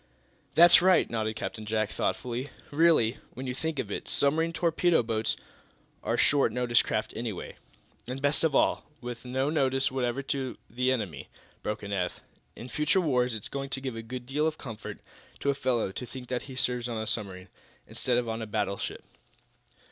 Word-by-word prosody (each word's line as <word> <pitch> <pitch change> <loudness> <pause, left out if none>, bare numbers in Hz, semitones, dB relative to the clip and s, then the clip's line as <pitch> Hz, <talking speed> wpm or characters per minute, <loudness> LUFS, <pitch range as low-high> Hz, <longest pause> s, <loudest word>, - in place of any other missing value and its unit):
"That's 175 +1 +9
right," 185 0 +5
nodded 110 -1 -1
Captain 110 0 -4
Jack, 110 0 0
thoughtfully. 125 +3 -2 0.2
"Really, 145 -7 +4 0.2
when 130 - -5
you 125 - -2
come - - -10
to - - -9
think 160 -2 -1
of - - -3
it, - - -4
submarine 160 +4 +2
torpedo 170 -2 +3
boats 110 -1 0 0.7
are - - 0
short 140 -5 +4
notice 120 0 +3
craft 110 - -2
anyway." 115 -6 -4 0.5
"And, 130 +2 -4
best 145 +3 +2
of 155 -4 +2
all, - - +2
with 120 -1 -7
no 130 +3 0
notice 135 -2 +2
whatever 130 +1 -1
to 135 -1 -2
the 125 +2 +1
enemy," 100 - -3 0.3
broke 105 0 -3
in 100 0 -4
Eph. 90 -2 -1 0.4
"In 120 - -8
future 150 +8 +2
wars 125 -8 +2
it's 105 - -4
going 135 0 -4
to 135 - -2
give 130 -3 -4
a 115 - -4
good 125 +2 -6
deal 145 +4 +1
of 155 -1 -2
comfort 110 -5 -7 0.4
to 140 - +2
a - - 0
fellow 125 -7 0
to 125 - -5
think 125 +1 -9
that 125 -1 -1
he 130 - -7
serves 125 -1 0
on 115 - -2
a 110 - -2
submarine, 95 -4 -2 0.4
instead 125 -1 0
of 120 -1 0
on 115 0 -2
a 110 - -4
battleship." 105 -2 -2
125 Hz, 195 wpm, -29 LUFS, 110-140 Hz, 0.7 s, That's